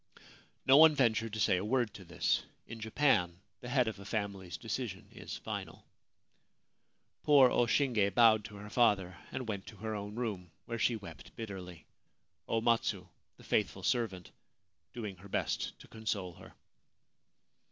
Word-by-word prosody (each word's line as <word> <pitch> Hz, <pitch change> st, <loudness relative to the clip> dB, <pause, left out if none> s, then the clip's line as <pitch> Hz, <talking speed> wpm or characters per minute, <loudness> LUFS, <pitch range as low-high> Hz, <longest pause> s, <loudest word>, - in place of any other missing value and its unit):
No 135 Hz, +1 st, +7 dB
one 160 Hz, 0 st, +8 dB
ventured 115 Hz, -4 st, +2 dB
to 110 Hz, -, -3 dB
say 95 Hz, -2 st, +3 dB
a 90 Hz, -, -2 dB
word 120 Hz, -1 st, 0 dB
to 95 Hz, -, -10 dB
this. 85 Hz, -1 st, 0 dB, 0.2 s
In 115 Hz, 0 st, -9 dB
Japan 110 Hz, -, +1 dB, 0.2 s
the 120 Hz, -, -8 dB
head 125 Hz, -2 st, +2 dB
of 110 Hz, -2 st, -4 dB
a -, -, -9 dB
family's 100 Hz, -3 st, -4 dB
decision 115 Hz, -4 st, -4 dB
is -, -, -7 dB
final. -, -, -6 dB, 1.4 s
Poor 140 Hz, -4 st, +6 dB
O 120 Hz, -, +3 dB
Shinge 115 Hz, -6 st, +2 dB
bowed 110 Hz, -3 st, +6 dB
to 105 Hz, -, -9 dB
her 105 Hz, +1 st, -9 dB
father, 100 Hz, -7 st, +2 dB, 0.2 s
and 130 Hz, -, -4 dB
went 100 Hz, -3 st, -4 dB
to 110 Hz, -, -10 dB
her 110 Hz, +2 st, -4 dB
own 105 Hz, 0 st, -5 dB
room, 105 Hz, -7 st, -3 dB, 0.2 s
where 115 Hz, 0 st, -4 dB
she 120 Hz, -, +2 dB
wept 85 Hz, -7 st, -11 dB
bitterly; 95 Hz, -6 st, -8 dB, 0.6 s
O 115 Hz, -, 0 dB
Matsu, 110 Hz, -5 st, +1 dB, 0.3 s
the -, -, -16 dB
faithful -, -, 0 dB
servant, 100 Hz, -7 st, -1 dB, 0.6 s
doing 105 Hz, -5 st, -6 dB
her 100 Hz, +3 st, -13 dB
best -, -, -2 dB
to -, -, -14 dB
console 105 Hz, -5 st, -3 dB
her. -, -, -15 dB
110 Hz, 160 wpm, -33 LUFS, 95-120 Hz, 1.4 s, one